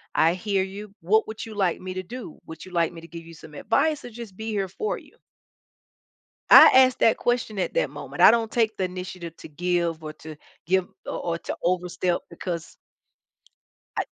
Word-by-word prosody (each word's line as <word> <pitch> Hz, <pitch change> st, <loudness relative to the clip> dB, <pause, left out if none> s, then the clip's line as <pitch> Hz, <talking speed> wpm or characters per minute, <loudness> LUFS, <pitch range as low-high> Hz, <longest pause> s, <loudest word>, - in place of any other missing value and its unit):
I 165 Hz, +1 st, +4 dB
hear 195 Hz, +1 st, 0 dB
you. 200 Hz, +2 st, -8 dB
What 210 Hz, +7 st, +2 dB
would 220 Hz, -, -6 dB
you 220 Hz, -1 st, -9 dB
like 190 Hz, -4 st, +1 dB
me 185 Hz, 0 st, -5 dB
to 185 Hz, -, -3 dB
do? 235 Hz, -1 st, -9 dB
Would 160 Hz, -, -9 dB
you 185 Hz, -, -13 dB
like 170 Hz, -2 st, +1 dB
me 170 Hz, -, -9 dB
to 165 Hz, -, -12 dB
give 165 Hz, -1 st, -9 dB
you 165 Hz, 0 st, -12 dB
some 155 Hz, 0 st, -14 dB
advice 300 Hz, -, +1 dB
or -, -, -7 dB
just 225 Hz, -4 st, -9 dB
be 220 Hz, +1 st, -5 dB
here 200 Hz, -2 st, -1 dB
for 430 Hz, -, -3 dB
you?" -, -, -17 dB, 1.3 s
I -, -, +10 dB
asked 260 Hz, -1 st, +6 dB
that 225 Hz, -, +4 dB
question 240 Hz, -4 st, -1 dB
at -, -, -1 dB
that -, -, +1 dB
moment. -, -, -7 dB
I -, -, +10 dB
don't 230 Hz, -1 st, 0 dB
take 220 Hz, -2 st, +1 dB
the 190 Hz, -, 0 dB
initiative 180 Hz, -2 st, -7 dB
to -, -, -11 dB
give 170 Hz, +1 st, -1 dB
or 155 Hz, 0 st, -6 dB
to 155 Hz, 0 st, -11 dB, 0.3 s
give 185 Hz, +2 st, +1 dB, 0.2 s
o -, -, -4 dB
or 165 Hz, -, -1 dB
to -, -, -5 dB
overstep 180 Hz, 0 st, 0 dB
because 170 Hz, -3 st, -6 dB, 1.2 s
I -, -, +1 dB
185 Hz, 205 wpm, -25 LUFS, 170-220 Hz, 1.3 s, I